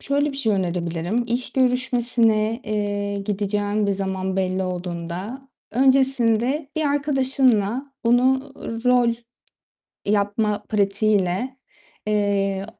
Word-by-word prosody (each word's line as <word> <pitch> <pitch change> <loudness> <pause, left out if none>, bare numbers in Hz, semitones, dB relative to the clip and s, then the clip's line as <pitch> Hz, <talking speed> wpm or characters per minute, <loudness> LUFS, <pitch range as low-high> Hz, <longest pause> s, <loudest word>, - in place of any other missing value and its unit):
şöyle 285 +1 0
bir - - -5
şey 225 -6 +2
önerebilirim; 175 +3 -1
iş 245 +2 0
görüşmesine, 240 -3 +2
eee, 205 -1 -2
gideceğin 205 +1 -1
bir 200 - +1
zaman 190 -1 -2
belli 185 0 0
olduğunda, 180 +7 -5 0.2
öncesinde 265 +1 +2
bir 315 - 0
arkadaşınla 265 -4 +1
bunu 250 +3 +4 0.4
rol 245 -2 +4 0.9
yapma 205 +1 0
pratiğiyle, 205 +2 +1 0.5
eee, 200 -2 0
215 Hz, 95 wpm, -22 LUFS, 195-255 Hz, 0.9 s, bunu